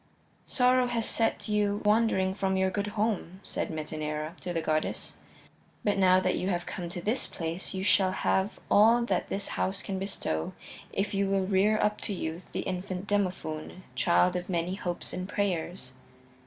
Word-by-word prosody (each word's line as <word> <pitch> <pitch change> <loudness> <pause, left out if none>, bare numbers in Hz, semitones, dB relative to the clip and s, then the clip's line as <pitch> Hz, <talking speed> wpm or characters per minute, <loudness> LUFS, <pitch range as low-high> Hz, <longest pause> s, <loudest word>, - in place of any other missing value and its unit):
"Sorrow 250 0 +4
has 235 -2 -1
set 225 0 0
you 210 -1 +1
wandering 210 -3 +3
from 190 -1 0
your 190 0 +2
good 205 +2 -1
home," 205 -4 -1
said - - -2
Metaneira 155 0 -3
to 180 - -3
the 170 - 0
goddess, 155 -1 -1 0.7
"but 205 -1 +2
now 185 -1 +6
that 185 -1 +1
you 185 - -1
have 175 -2 -1
come 175 -4 -5
to 175 +1 -5
this 230 +5 0
place 165 +3 -4
you 190 - -2
shall 190 -2 +4
have 190 +1 0
all 230 +3 +6
that - - 0
this 200 0 -3
house 190 0 -1
can 195 -2 -3
bestow 135 - -2 0.4
if 200 +2 -1
you 195 0 +1
will 195 -1 +2
rear 200 +3 +3
up 210 0 +1
to 205 - -2
youth 165 +1 -5
the - - -2
infant 185 0 -4
Demophoon, 185 -4 -2
child 180 +1 +3
of 180 +1 -3
many 175 0 0
hopes 175 -3 -4
and 185 +2 -4
prayers." 180 -8 -2
190 Hz, 175 wpm, -29 LUFS, 175-205 Hz, 0.7 s, now